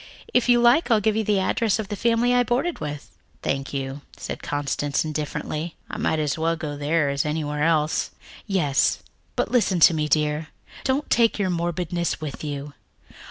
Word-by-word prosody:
If 245 0 +3
you 240 0 +6
like, 240 +7 +4
I'll 225 -2 +5
give 210 +1 +1
you 220 - +1
the 210 -1 +2
address 215 +2 +1
of 215 -3 -4
the 205 - -2
family 235 +3 +2
I 245 - +5
boarded 250 +9 0
with." 150 -1 -6 0.3
"Thank 135 0 -2
you," 135 0 -4 0.2
said - - -6
Constance 145 0 -1
indifferently. 155 +1 -3 0.2
"I - - -4
might 160 - +1
as 150 0 -1
well 165 +1 +1
go 150 -2 -5
there 145 +1 +1
as 140 0 0
anywhere 150 -1 -2
else." 155 -1 +2 0.4
"Yes, 160 -9 +1 0.3
but - - -1
listen 200 -7 +2
to 170 - +8
me, 155 -1 0
dear. 150 0 +1 0.4
Don't 270 +3 0
take 230 -1 +4
your 195 -3 0
morbidness 175 0 -1
with 155 -1 -6
you. 145 -1 -5
160 Hz, 180 wpm, -24 LUFS, 150-215 Hz, 0.4 s, to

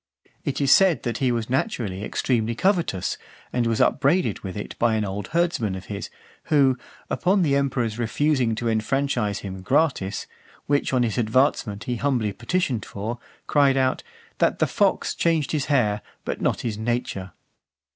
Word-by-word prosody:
It 140 - -2
is 140 -2 +3
said 190 -4 +5
that 120 -2 -2
he 130 -2 +2
was 115 -2 -1
naturally 120 - -1
extremely 115 0 0
covetous, 170 - 0 0.3
and 120 -2 +1
was 115 -1 0
upbraided 140 - +2
with 95 0 -6
it 105 - -6
by 115 -1 +3
an 110 -1 0
old 100 0 -4
herdsman 165 - 0
of 95 - -8
his, 100 - -5 0.4
who, 140 -4 +4 0.3
upon 185 +1 +2
the 140 -4 +2
emperor's 125 -5 0
refusing 125 0 +1
to 120 +1 -3
enfranchise 115 -1 0
him 95 -1 -6
gratis, 125 -4 +1 0.4
which 145 0 +1
on 130 -2 +2
his 115 +1 -1
advancement 115 -3 +1
he 125 -1 -2
humbly 120 -6 0
petitioned 120 - -1
for, 110 +4 -5 0.3
cried 140 -2 +3
out, 130 -1 +1 0.4
"That - - +2
the - - +3
fox - - +1
changed 165 -4 +1
his 150 -3 0
hair, 105 -8 +2 0.2
but - - -3
not - - 0
his 110 -3 -3
nature." 110 -5 -2
120 Hz, 165 wpm, -24 LUFS, 105-140 Hz, 0.4 s, said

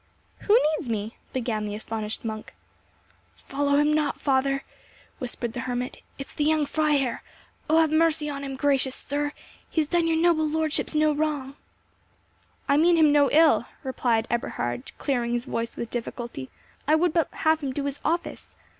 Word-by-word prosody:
"Who 425 +2 +4 0.2
needs 265 - -6
me?" 215 0 -3 0.2
began 230 -4 -2
the 205 0 -4
astonished 220 0 -5
monk. 215 -1 -6 0.9
"Follow 285 +1 +1
him 295 +1 +4
not, 300 -1 0
father!" 275 0 +1 0.6
whispered 240 -3 -4
the 245 - -4
hermit. 250 +1 -3 0.2
"It 275 - -5
is - - -16
the 300 - -1
young 310 0 +3
Freiherr.—Oh 300 +1 -1
have 320 -2 +4
mercy 315 -1 +2
on 280 -1 -4
him, 270 -1 -4
gracious 270 -1 +1
sir; 290 +1 -2 0.4
he - - -1
has 305 - +1
done 340 +1 +2
your 325 -1 +2
noble 325 -2 +3
lordships 315 0 -1
no 305 0 +4
wrong." 290 -3 -2 1.1
"I 280 - +4
mean 340 +3 +5
him 315 -3 +5
no 290 -1 +5
ill," 320 +1 +5 0.2
replied 240 -4 0
Eberhard, 120 - -2
clearing 240 -4 -1
his 240 +1 -1
voice 230 -3 -3
with 235 - -5
difficulty; 235 - -5 0.4
"I 305 - +5
would 335 0 +2
but 330 -2 +1
have 315 0 +2
him 275 -2 -2
do 280 +2 -3
his 280 0 -3
office. 340 +1 -2
285 Hz, 170 wpm, -26 LUFS, 240-310 Hz, 1.1 s, mean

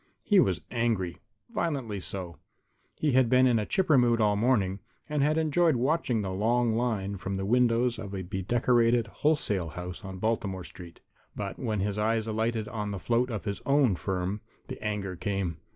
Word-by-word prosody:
He 205 -3 +4
was - - +2
angry, 110 -8 -1 0.3
violently 130 -11 -2
so. 90 -4 -5 0.6
He 150 - +1
had 130 -2 +4
been 130 +1 +5
in 120 -3 +3
a 105 - -3
chipper 165 -8 +3
mood 120 -1 +3
all 105 -2 +3
morning 100 -4 +1 0.3
and 150 -2 -1
had 150 +2 +2
enjoyed 160 0 +3
watching 125 -3 +1
the 95 - -3
long 115 +4 +1
line 110 -4 -1
from 95 +1 -4
the 95 0 -2
windows 120 +1 +2
of 100 -3 -6
a 95 - -4
bedecorated 115 +5 +2
wholesale 105 - 0
house 90 +4 -7
on 95 -1 -7
Baltimore 100 -3 -1
street. 85 -1 -12 0.3
But - - -5
when 105 -3 -1
his 105 +1 -1
eyes 110 +1 +1
alighted 110 0 -1
on 105 -2 -4
the 100 - -3
float 120 +5 +1
of 110 -4 -4
his 100 -1 -3
own 140 -7 +3
firm, 95 +2 -3 0.3
the - - -7
anger 105 -3 -2
came. 95 -3 -2
110 Hz, 180 wpm, -28 LUFS, 95-125 Hz, 0.6 s, been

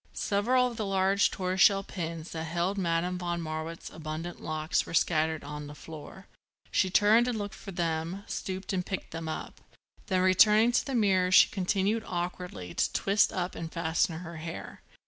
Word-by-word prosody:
Several 240 +5 +2
of 240 -2 -4
the 215 - -2
large 195 +1 +3
tortoiseshell 195 +2 +3
pins 165 -3 -6
that 160 0 -4
held 170 +4 -1
Madame 180 -1 0
von 175 -1 -2
Marwitz's 160 0 -5
abundant 160 +2 -6
locks 155 +1 0
were - - -4
scattered 160 -1 +1
on 150 0 -6
the 145 - -9
floor. 160 +5 -10 0.5
She 190 - +2
turned 215 +5 +5
and 245 -3 -1
looked 205 -1 -4
for 195 - -9
them, 170 +2 -2
stooped 190 +1 -4
and 180 -1 0
picked 190 +1 -5
them 165 0 -5
up. 155 - -6 0.5
Then 185 -2 +1
returning 210 +5 +5
to - - +2
the 270 - -3
mirror 190 -5 +3
she - - +7
continued, 200 +3 0
awkwardly, 175 - -4
to - - 0
twist 200 +1 +3
up 180 0 -2
and 165 -1 -6
fasten 165 0 0
her 170 -2 -8
hair. 165 +1 -7
180 Hz, 175 wpm, -29 LUFS, 165-195 Hz, 0.5 s, she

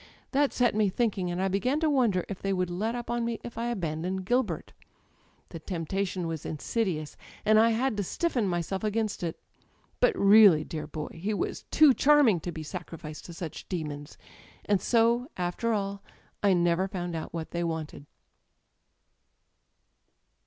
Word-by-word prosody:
That 285 0 +2
set 245 -1 +2
me 210 -1 +2
thinking, 195 -4 0
and 175 +1 -3
I 190 - +1
began 250 +10 0
to 320 - +3
wonder 240 - +2
if 195 - -7
they 195 0 0
would 180 -1 -1
let 215 +7 -2
up 240 -1 -5
on 240 0 0
me 230 -1 -2
if 235 - -8
I 235 +1 -2
abandoned 185 -3 -3
Gilbert. 250 +5 -1 0.8
The 165 - -7
temptation 180 +2 -3
was: 165 -2 -4
insidious, 160 -1 -2 0.3
and 215 0 +6
I 225 +1 +5
had 235 +2 +1
to 205 - 0
stiffen 245 - -1
myself 175 +2 -2
against 215 0 -1
it; 170 -2 -3 0.6
but 475 -6 +3
really, 200 -6 +7
dear 155 0 -6
boy! 150 -1 -5
he 200 +6 -2
was - - -3
too 305 -4 +6
charming 275 - +5
to 175 - -5
be 160 -2 -6
sacrificed 160 -2 -8
to 170 - -9
such 165 -2 -7
demons. 150 -5 -5 0.5
And 205 -2 +2
so, 235 +1 +3
after 180 +6 -1
all, 200 -2 -2 0.4
I 200 -2 +4
never 175 +1 +2
found 175 -3 -4
out 160 - -5
what 165 -1 -5
they 170 0 -2
wanted 160 -3 -4
195 Hz, 165 wpm, -28 LUFS, 170-230 Hz, 0.8 s, really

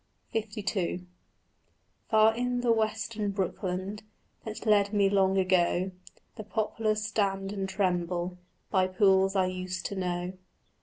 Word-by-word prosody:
LII 205 -4 -2 1.0
Far 220 0 +5
in 245 +1 -1
a 235 - +4
western 220 -1 0
brookland 190 +1 -3 0.4
That 220 -1 -6
bred 205 -2 +3
me 200 -1 +3
long 195 -1 +3
ago 185 0 +2 0.5
The 215 - -5
poplars 215 0 -1
stand 195 -2 0
and 195 -1 -3
tremble 180 -2 -1 0.3
By 185 -1 +3
pools 190 +1 +3
I 190 -1 +3
used 185 0 -4
to 200 - -3
know. 180 -1 -2
195 Hz, 120 wpm, -29 LUFS, 185-215 Hz, 1.0 s, Far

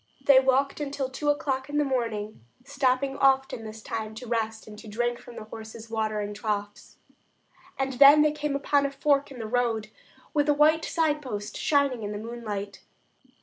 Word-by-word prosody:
They 275 -2 +8
walked 265 +2 +1
until 275 -2 -3
two 295 +3 -2
o'clock 275 -2 -1
in 295 - -2
the 295 - +3
morning, 225 - -3 0.2
stopping 270 0 0
often 270 -3 +2
this 220 0 -9
time 220 -1 -5
to 250 +3 -8
rest 225 -1 -2
and 215 - -11
to 220 - -12
drink 240 +3 -1
from 240 - -13
the - - -7
horses' 220 +1 -10
watering 215 -2 -2
troughs. 205 0 -4 0.8
And 270 0 -1
then 285 +3 +8
they 305 - +3
came 295 -1 -3
upon 280 0 +2
a - - -7
fork 280 0 +1
in 270 - -10
the 225 - -5
road 225 -2 -1 0.4
with 295 -1 +2
a 295 - +4
white 310 +2 +4
signpost 295 -10 -2
shining 280 -5 +1
in 205 0 -4
the - - -4
moonlight. 210 -3 -6
255 Hz, 180 wpm, -27 LUFS, 220-280 Hz, 0.8 s, They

